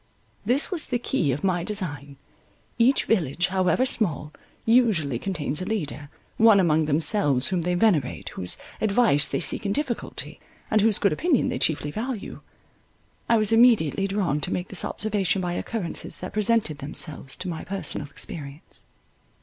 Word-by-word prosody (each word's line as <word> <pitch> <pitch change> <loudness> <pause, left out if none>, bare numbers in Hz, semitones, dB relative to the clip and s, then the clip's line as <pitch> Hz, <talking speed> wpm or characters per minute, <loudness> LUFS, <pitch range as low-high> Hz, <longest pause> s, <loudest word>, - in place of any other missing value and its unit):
This 265 +9 0
was 340 -5 0
the 245 - 0
key 235 - 0
of 135 +3 -3
my 180 -3 +1
design. 145 -9 -4 0.6
Each 250 +4 +3
village, 175 -4 +1
however 190 +6 +2
small, 155 - -2 0.3
usually 210 - +2
contains 155 -4 -3
a - - -3
leader, 150 -8 -4 0.3
one 220 -3 +6
among 160 -3 +3
themselves 145 -3 +2
whom 185 -2 0
they 180 +2 -1
venerate, 175 - +1
whose 90 -1 -1 0.2
advice 210 -9 +3
they - - -1
seek 155 - +1
in 200 -1 -1
difficulty, 275 -4 -4 0.3
and 215 - +4
whose 215 -1 +3
good 200 - +2
opinion 320 -7 +1
they - - -3
chiefly 150 -2 0
value. 225 - -5 0.9
I 230 - +5
was 215 -1 +2
immediately 225 - +4
drawn 190 -7 -1
to 180 - -1
make 180 +1 -3
this 195 - 0
observation 205 -3 -1
by 175 -1 -2
occurrences 180 -1 -3
that 185 - -7
presented 215 -8 +1
themselves 145 -1 -4
to 185 - -7
my 165 -3 -4
personal 175 -6 -3
experience. 140 0 -4
185 Hz, 160 wpm, -25 LUFS, 150-220 Hz, 0.9 s, one